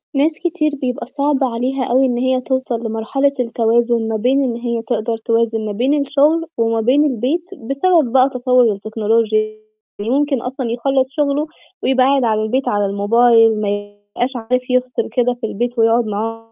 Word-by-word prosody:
ناس 305 +3 +1
كتير 315 -3 -1
بيبقى 250 -2 -3
صعب 280 +1 -1
عليها 255 +2 -1
أوي 255 +2 +2
إن 245 -2 0
هي 260 +1 +1
توصَل 260 -3 -2
لمرحلة 225 +6 0
التوازن 235 -1 +1
ما 220 - -2
بين 260 +5 +2
إن 240 -3 -1
هي 235 -1 -3
تقدَر 225 0 -2
توازن 225 -1 0
ما 210 - -3
بين 265 +8 +1
الشغل 295 +4 +2
وما 230 -1 +1
بين 265 +6 +3
البيت، 270 +6 -1
بسبب 275 +1 +1
بقى 260 +1 +4
تطوّر 250 -2 +3
التكنولوجيا، 215 +1 0 0.5
ويمكن 270 +4 0
أصلًا 250 -1 -4
يخلَّص 265 +2 +1
شغلُه 290 +1 -1 0.4
ويبقى 260 -1 +3
قاعد 275 0 +2
على 215 -2 +1
البيت 255 +5 -1
على 205 0 +1
الموبايل، 225 +2 +3
ما 205 - -1
يبقاش 205 +5 -4
عارف 250 +2 -2
يفصِل 250 -2 0
كده 245 0 +1
في 225 - -2
البيت 240 +3 -3
ويقعد 225 +1 +3
مع. 225 +2 -4
245 Hz, 165 wpm, -18 LUFS, 225-265 Hz, 0.5 s, بقى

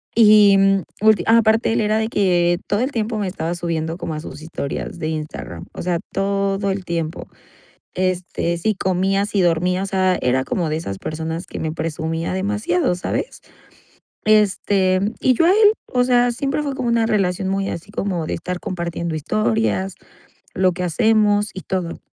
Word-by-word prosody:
Y 210 -3 +7 0.4
ulti 215 -4 +4
ah, 230 +1 +6
aparte, 225 0 +2
él - - +1
era 215 +1 +1
de 220 0 0
que 175 -5 +2
todo 205 - 0
el 260 - 0
tiempo 225 -2 -2
me 200 -2 -1
estaba 175 -2 -3
subiendo 165 -1 -3
como 165 - -4
a 155 - -5
sus 155 - -9
historias 160 +1 -5
de 155 - -2
Instagram, 150 - -6
o - - -6
sea, 175 -1 -1
todo 195 0 0
el 190 -1 -4
tiempo. 165 -2 -3 0.7
Este, 180 -2 -1
si 210 +5 0
comía, 190 +2 +1
si 205 -2 -1
dormía, 180 +2 +1
o 195 - -2
sea, 185 -1 +1
era 130 +1 +1
como 170 +1 -1
de 155 - -1
esas 100 - -5
personas 160 - -4
que - - -7
me 160 -1 -2
presumía 160 +1 -3
demasiado, 190 -2 0
¿sabes? 180 - -4 0.8
Este, 200 -3 +3 0.2
y 255 - +3
yo 330 - +2
a 340 - +5
él, 420 +2 +6
o 250 -1 +1
sea, 245 -1 +3
siempre 275 +4 -2
fue 280 -2 -3
como 250 - -2
una 235 -1 +2
relación 190 -4 0
muy 195 0 -1
así 170 +4 -6
como 185 -6 -2
de - - -4
estar 180 +2 -4
compartiendo 170 -3 -4
historias, 215 +2 0 0.6
lo 185 -4 +2
que 180 +1 -4
hacemos 210 +3 +2
y 190 - -5
todo, 180 -3 -3
190 Hz, 180 wpm, -20 LUFS, 170-215 Hz, 0.8 s, Y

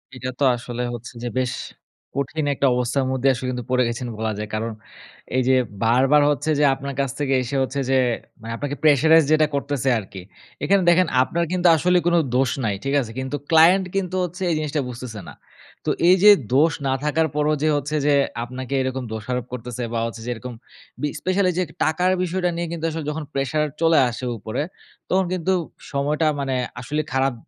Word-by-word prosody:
এইটা 130 0 -5
তো - - +1
আসলে 120 0 -6
হচ্ছে 120 +1 -9
যে - - -2
বেশ 125 -1 0 0.6
কঠিন 140 +2 -2
একটা 140 - +2
অবস্থার 125 +2 0
মধ্যেই 130 +1 +2
আসলে 125 +1 -4
কিন্তু 125 -2 -5
পড়ে 125 0 +3
গেছেন 120 +1 -4
বলা 110 0 -1
যায়। 105 0 -5
কারণ, 110 +1 -2 0.7
এই - - +4
যে 130 - +5 0.3
বারবার 130 +6 +4
হচ্ছে 145 +1 -1
যে - - +3
আপনার 140 +1 -5
কাছ 135 -2 0
থেকে 140 -2 0
এসে 125 +3 -4
হচ্ছে 130 +1 -3
যে 135 - +3 0.4
মানে 115 +1 -7
আপনাকে 145 +2 -3
প্রেশারাইজ 155 +2 +6
যেটা 155 0 +4
করতেছে 140 -2 -1
আরকি। 95 -2 -9 0.4
এখানে 200 0 +3
দেখেন 175 +1 +4 0.2
আপনার 170 +6 -1
কিন্তু 180 -1 +2
আসলে 180 +3 +3
কোন 175 - +3 0.2
দোষ 130 -2 +2
নাই। 105 -2 0
ঠিক 135 - -1
আছে? 115 -4 -6
কিন্তু 130 +2 -3
ক্লায়েন্ট 170 +4 +6
কিন্তু 185 -2 -1
হচ্ছে 180 +1 -6
এই - - +1
জিনিসটা 150 -1 -1
বুঝতেছে 120 -3 -7
না। - - -9 0.5
তো - - 0 0.2
এই 185 - +8
যে 210 - +10 0.3
দোষ 155 +4 +5 0.2
না 130 - +2
থাকার 160 +2 +1
পরেও 150 +1 +2
যে - - +3
হচ্ছে 145 +2 -3
যে 145 - +4 0.3
আপনাকে 130 +2 -6
এরকম 130 0 -2
দোষারোপ 115 +3 -3
করতেছে 125 0 -5
বা, 115 - 0
হচ্ছে 115 0 -8
যে - - -4
এরকম 125 +2 -8 0.5
বি 150 - +1
স্পেশালি 185 0 +1
এই - - -8
যে - - +2 0.2
টাকার 180 +4 +2
বিষয়টা 180 0 0
নিয়ে 170 0 -2
কিন্তু 165 -1 -4
আসলে 160 0 -4
যখন 155 +1 -4
প্রেশার 140 +3 0 0.2
চলে 165 -1 +4
আসে 120 +2 -6
উপরে, 110 +5 -4 0.5
তখন 190 0 +2
কিন্তু 185 +1 0 0.4
সময়টা 150 +3 0
মানে 135 -2 -1 0.2
আসলে 145 +5 -2
খারাপ 135 0 +2
140 Hz, 195 wpm, -22 LUFS, 125-160 Hz, 0.7 s, যে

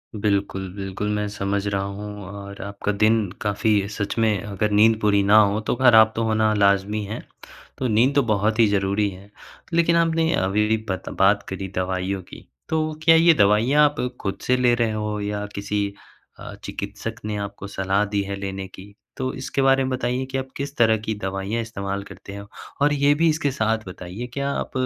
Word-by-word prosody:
बिल्कुल, 100 -2 -1
बिल्कुल 95 +1 -4
मैं 105 0 -1
समझ 100 0 -2
रहा 100 -1 0
हूँ 105 +1 -6
और 100 0 -9
आपका 100 +1 -3
दिन 105 0 +2
काफ़ी 105 -1 +1
सच 105 0 -4
में 110 -4 +2
अगर 105 +1 -2
नींद 110 +2 +4
पूरी 100 -1 +3
ना 105 +2 +5
हो 105 0 +3
तो - - +1
ख़राब 115 -3 +6
तो 115 - 0
होना 110 -1 +2
लाज़मी 100 +1 +2
है। 105 - -5 0.6
तो 130 - -1
नींद 120 +5 +3
तो 140 - +5
बहुत 110 0 0
ही 115 - +7
ज़रूरी 100 +1 +1
है। 95 +1 -12 0.4
लेकिन 170 0 +3
आपने 165 -1 +2
अभी-अभी 105 +4 +1
बत 95 - -3
बात 100 +1 +4
करी 95 0 -4
दवाइयों 95 +1 -2
की - - -12 0.2
तो 155 -1 0
क्या 165 0 +7
ये 165 +1 +6
दवाइयाँ 115 +6 +4
आप 145 - -14 0.3
ख़ुद 100 - -3
से 125 - +3
ले 125 -1 +3
रहे 115 -2 +1
हो 105 -1 -3
या 105 0 -3
किसी 100 0 -2 0.5
अ, - - -8
चिकित्सक - - -5
ने 105 0 -2
आपको 100 0 -6
सलाह 95 +1 0
दी 100 0 -1
है 100 0 -4
लेने 95 -1 -5
की? 100 +2 -14 0.2
तो 130 0 -2
इसके 130 +1 -3
बारे 135 0 +4
में 130 - -2
बताइये 125 +1 -1
कि 135 0 -4
आप 130 - -3
किस 140 +1 -5
तरह 110 -1 +4
की 110 0 -4
दवाइयाँ 95 +4 -2
इस्तेमाल 100 -3 -4
करते 100 0 -11
हैं? 100 0 -8 0.4
और 145 0 +4
ये 145 0 +3
भी 165 +2 +3
इसके 150 -2 0
साथ 110 -3 0
बताइए 90 +6 -7
क्या 140 0 -1
आप - - -3
105 Hz, 195 wpm, -23 LUFS, 100-120 Hz, 0.6 s, ही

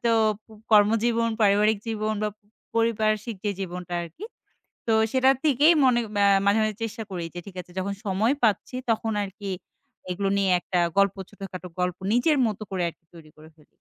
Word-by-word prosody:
তো 235 - +3 0.3
প - - -57 0.2
কর্মজীবন, 225 +2 +4
পারিবারিক 210 +1 +4
জীবন 215 -1 -1
বা 215 - +1 0.5
পরিপার্শিক 220 -1 +1
যে 205 - +1
জীবনটা 180 -1 -5
আরকি। 170 - -9 0.6
তো, - - +2 0.2
সেটা 260 0 +4
থেকেই 300 +2 +5
মনে 250 -2 +4
আ 205 -1 0 0.2
মাঝে, 200 +2 +4
মাঝে 215 -1 0
চেষ্টা 225 0 -4
করি 180 -2 -4
যে, 175 - -6
ঠিক 195 - -11
আছে 180 - -19
যখন 200 +2 -2
সময় 205 +6 +2
পাচ্ছি, 220 +3 +1 0.2
তখন 225 0 -1
আরকি, 200 0 -6 0.6
এগুলো 195 +2 -1
নিয়ে 195 -1 +2
একটা 180 +1 -1 0.2
গল্প 200 0 +4
ছোটখাটো 190 -3 -8
গল্প 180 -1 0 0.2
নিজের 290 +6 +3
মত 210 -3 -4
করে, 185 -2 -2
আরকি 165 0 -10
তৈরি 160 -2 -14
করে 155 +1 -14
ফেলি। 150 - -23
210 Hz, 175 wpm, -25 LUFS, 190-225 Hz, 0.6 s, থেকেই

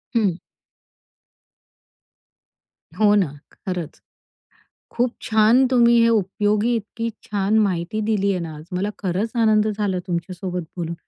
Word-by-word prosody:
हं. 195 -7 +1 2.6
हो 210 -1 +4
ना, 195 -5 +3 0.3
खरंच, 175 -4 -6 0.9
खूप 245 0 -1
छान. 220 +4 +4
तुम्ही 235 -2 +4
हे 230 - +4
उपयोगी, 210 +2 +1
इतकी 230 +1 -4
छान 205 +1 0
माहिती 195 0 0
दिलीये 200 -3 0
ना 165 -2 -6
आज. 150 - -11
मला 190 +3 -1
खरंच 195 +4 -2
आनंद 215 -1 +3
झाला 200 -3 -1
तुमच्या 175 +1 -3
सोबत 180 -1 -4
बोलून 170 -1 -3
205 Hz, 120 wpm, -22 LUFS, 180-220 Hz, 2.6 s, हो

